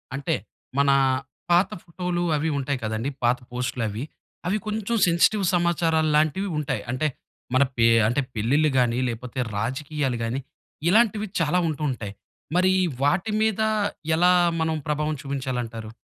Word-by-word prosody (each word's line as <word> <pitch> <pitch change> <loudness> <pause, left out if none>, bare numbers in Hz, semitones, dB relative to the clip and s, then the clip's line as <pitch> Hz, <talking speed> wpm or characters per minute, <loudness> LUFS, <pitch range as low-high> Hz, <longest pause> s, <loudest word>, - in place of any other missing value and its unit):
అంటే, 140 0 -1 0.4
మన 140 0 +4 0.6
పాత 175 +3 +5
ఫోటోలు, 175 0 -3
అవి 155 +2 0
ఉంటాయి 140 0 -1
కదండీ! 110 +5 -2
పాత 120 +1 +3
పోస్ట్‌లవి. 125 -3 -3 0.4
అవి 205 +4 +1
కొంచెం 220 +2 -1
సెన్సిటివ్ 190 +4 +3
సమాచారాలాంటివి 165 0 +2
ఉంటాయి. 135 -7 -2
అంటే, 145 +5 0 0.5
మన 130 +2 +5
పే 115 0 +5 0.2
అంటే 125 +5 +1
పెళ్లిళ్లు 140 +8 +2
గాని, 120 0 +2
లేకపోతే 125 +2 -5 0.2
రాజకీయాలు 135 +3 -2
గాని, 115 +4 -1 0.5
ఇలాంటివి 215 +1 +3
చాలా 165 +3 +2
ఉంటూ 155 -1 -3
ఉంటాయి. 105 -5 -6 0.4
మరి 185 +1 +4 0.3
వాటి 175 +9 +2
మీద, 220 -1 +1 0.5
ఎలా 180 +2 +5 0.3
మనం 160 0 +1
ప్రభావం 150 +1 0
చూపించాలంటారు? 125 -5 -4
150 Hz, 125 wpm, -24 LUFS, 125-175 Hz, 0.6 s, పాత